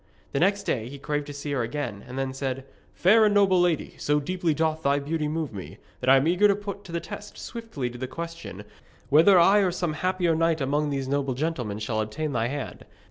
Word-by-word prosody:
The 140 Hz, -, 0 dB
next 200 Hz, +3 st, +2 dB
day 115 Hz, -2 st, -2 dB
he 140 Hz, -, -8 dB
craved 145 Hz, +1 st, -3 dB
to 145 Hz, -, -6 dB
see 145 Hz, +1 st, -5 dB
her 135 Hz, -3 st, 0 dB
again, 115 Hz, -5 st, -4 dB
and 125 Hz, +1 st, -7 dB
then 135 Hz, -1 st, -2 dB
said: 135 Hz, -1 st, -3 dB, 0.3 s
'Fair 215 Hz, +5 st, +5 dB
and 210 Hz, -1 st, +3 dB
noble 190 Hz, -3 st, +5 dB
lady, 175 Hz, -4 st, 0 dB
so 150 Hz, 0 st, +2 dB
deeply 175 Hz, +3 st, -1 dB
doth 160 Hz, 0 st, 0 dB
thy 140 Hz, -1 st, +2 dB
beauty 150 Hz, +2 st, -2 dB
move 155 Hz, -4 st, -3 dB
me, 95 Hz, -3 st, -8 dB, 0.2 s
that 130 Hz, -, 0 dB
I 135 Hz, -, +8 dB
am 135 Hz, +3 st, +2 dB
eager 180 Hz, +5 st, +5 dB
to 200 Hz, -, +3 dB
put 200 Hz, -1 st, -6 dB
to 175 Hz, -, -10 dB
the 170 Hz, -, -1 dB
test 205 Hz, +3 st, -9 dB
swiftly 225 Hz, -, -5 dB
the 125 Hz, +1 st, -5 dB
question 165 Hz, +5 st, -7 dB, 0.5 s
whether 165 Hz, +6 st, +7 dB
I 195 Hz, +4 st, +6 dB
or 195 Hz, -2 st, +3 dB
some 175 Hz, -2 st, -2 dB
other 150 Hz, -, -7 dB
happier 180 Hz, -2 st, +1 dB
knight 165 Hz, 0 st, +2 dB
among 145 Hz, +2 st, 0 dB
these 135 Hz, -2 st, -2 dB
noble 135 Hz, -1 st, 0 dB
gentlemen 130 Hz, -8 st, -2 dB
shall 110 Hz, 0 st, -1 dB
obtain 150 Hz, +8 st, -3 dB
thy 115 Hz, -3 st, 0 dB
hand. 140 Hz, +2 st, -5 dB
150 Hz, 230 wpm, -26 LUFS, 135-175 Hz, 0.5 s, I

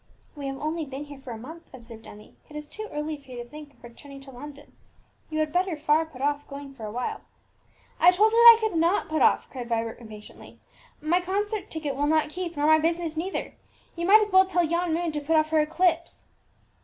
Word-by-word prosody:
"We 285 Hz, -2 st, -6 dB
have 270 Hz, 0 st, -4 dB
only 310 Hz, +3 st, -3 dB
been 275 Hz, 0 st, -7 dB
here 290 Hz, -2 st, -11 dB
for 270 Hz, -1 st, -12 dB
a 230 Hz, -, -6 dB
month," 320 Hz, +9 st, -11 dB
observed 230 Hz, -3 st, -11 dB
Emmie; 210 Hz, +1 st, -14 dB, 0.2 s
"it 300 Hz, -, -13 dB
is 300 Hz, 0 st, -7 dB
too 430 Hz, +7 st, -8 dB
early 300 Hz, +1 st, -4 dB
for 275 Hz, -2 st, -22 dB
you 245 Hz, -1 st, -7 dB
to -, -, -17 dB
think 295 Hz, +2 st, -11 dB
of -, -, -29 dB
returning 275 Hz, +4 st, -12 dB
to 270 Hz, 0 st, -12 dB
London. 290 Hz, +3 st, -12 dB, 0.5 s
You 310 Hz, -, -4 dB
had 310 Hz, -1 st, -1 dB
better 360 Hz, -2 st, 0 dB
far 305 Hz, +2 st, +2 dB
put 270 Hz, -5 st, -12 dB
off 290 Hz, 0 st, -1 dB
going 280 Hz, -1 st, -9 dB
for 230 Hz, -5 st, -9 dB
a -, -, -6 dB
while." 245 Hz, +3 st, -4 dB, 0.8 s
"I 350 Hz, -, +7 dB
told 415 Hz, +5 st, +4 dB
you 455 Hz, -, +1 dB
that 470 Hz, -1 st, +10 dB
I 440 Hz, -1 st, 0 dB
could 350 Hz, -6 st, -2 dB
not 345 Hz, +4 st, +1 dB
put 310 Hz, 0 st, -1 dB
off!" -, -, +3 dB
cried 245 Hz, -3 st, -7 dB
Vibert 225 Hz, -1 st, -2 dB
impatiently. 215 Hz, -2 st, -13 dB, 0.4 s
"My 345 Hz, +4 st, +2 dB
concert 410 Hz, +3 st, -3 dB
ticket 300 Hz, -4 st, -4 dB
will 290 Hz, +2 st, 0 dB
not 310 Hz, 0 st, +2 dB
keep, 345 Hz, -1 st, -5 dB
nor 290 Hz, -, +1 dB
my 315 Hz, 0 st, +6 dB
business 330 Hz, 0 st, -1 dB
neither. 355 Hz, +5 st, -4 dB, 0.4 s
You 340 Hz, 0 st, -3 dB
might 430 Hz, +3 st, +7 dB
as 420 Hz, -1 st, -1 dB
well 375 Hz, 0 st, +6 dB
tell 360 Hz, -2 st, +1 dB
yon 340 Hz, +1 st, 0 dB
moon 335 Hz, +1 st, -1 dB
to 300 Hz, -1 st, -4 dB
put 320 Hz, +3 st, 0 dB
off 310 Hz, 0 st, +2 dB
her 315 Hz, -, +3 dB
eclipse!" 335 Hz, +2 st, 0 dB
310 Hz, 235 wpm, -26 LUFS, 275-345 Hz, 0.8 s, that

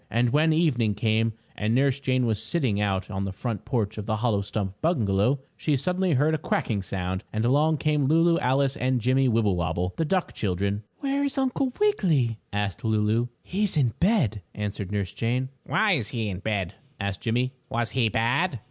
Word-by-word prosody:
And 120 Hz, +1 st, +2 dB
when 155 Hz, +3 st, +3 dB
evening 125 Hz, -10 st, +2 dB
came 110 Hz, +1 st, +1 dB, 0.2 s
and 110 Hz, +2 st, 0 dB
Nurse 135 Hz, +1 st, +2 dB
Jane 130 Hz, -2 st, +1 dB
was 110 Hz, -2 st, 0 dB
sitting 110 Hz, -4 st, 0 dB
out 95 Hz, -1 st, -1 dB
on 95 Hz, 0 st, -2 dB
the 95 Hz, -, -3 dB
front 110 Hz, +1 st, -4 dB
porch 110 Hz, -5 st, -1 dB
of 105 Hz, -, -6 dB
the 110 Hz, -, +1 dB
hollow 110 Hz, -2 st, +1 dB
stump 100 Hz, 0 st, -4 dB
bungalow, 125 Hz, -, +2 dB
she 150 Hz, -, 0 dB
suddenly 180 Hz, +4 st, 0 dB
heard 145 Hz, +4 st, +3 dB
a 155 Hz, -, 0 dB
quacking 110 Hz, -8 st, -1 dB
sound, 95 Hz, 0 st, -3 dB
and 110 Hz, +1 st, -1 dB
along 150 Hz, +5 st, +3 dB
came 150 Hz, 0 st, +1 dB
Lulu, 165 Hz, +3 st, +4 dB
Alice 135 Hz, +1 st, +2 dB
and 130 Hz, 0 st, 0 dB
Jimmie 130 Hz, +3 st, +2 dB
Wibblewobble, 90 Hz, -6 st, 0 dB
the 165 Hz, -, +1 dB
duck 180 Hz, +3 st, 0 dB
children. 100 Hz, +1 st, -1 dB, 0.2 s
"Where 280 Hz, 0 st, 0 dB
is 280 Hz, -1 st, -1 dB
Uncle 265 Hz, 0 st, 0 dB
Wiggily?" 160 Hz, -, +2 dB
asked 100 Hz, -2 st, -2 dB
Lulu. 110 Hz, +1 st, +1 dB, 0.2 s
"He 195 Hz, +3 st, -3 dB
is 185 Hz, -5 st, 0 dB
in 125 Hz, -6 st, +2 dB
bed," 165 Hz, -, +2 dB
answered 100 Hz, -2 st, -4 dB
Nurse 100 Hz, -3 st, -2 dB
Jane. 125 Hz, +3 st, -1 dB, 0.2 s
"Why 220 Hz, -1 st, +2 dB
is 135 Hz, -, +1 dB
he 115 Hz, -3 st, -2 dB
in 90 Hz, -2 st, -4 dB
bed?" 100 Hz, -4 st, -2 dB, 0.3 s
asked 100 Hz, -1 st, -3 dB
Jimmie. 125 Hz, +3 st, 0 dB, 0.2 s
"Was 115 Hz, -1 st, -1 dB
he 120 Hz, -4 st, +2 dB
bad?" 125 Hz, -, +1 dB
120 Hz, 190 wpm, -26 LUFS, 105-150 Hz, 0.3 s, Lulu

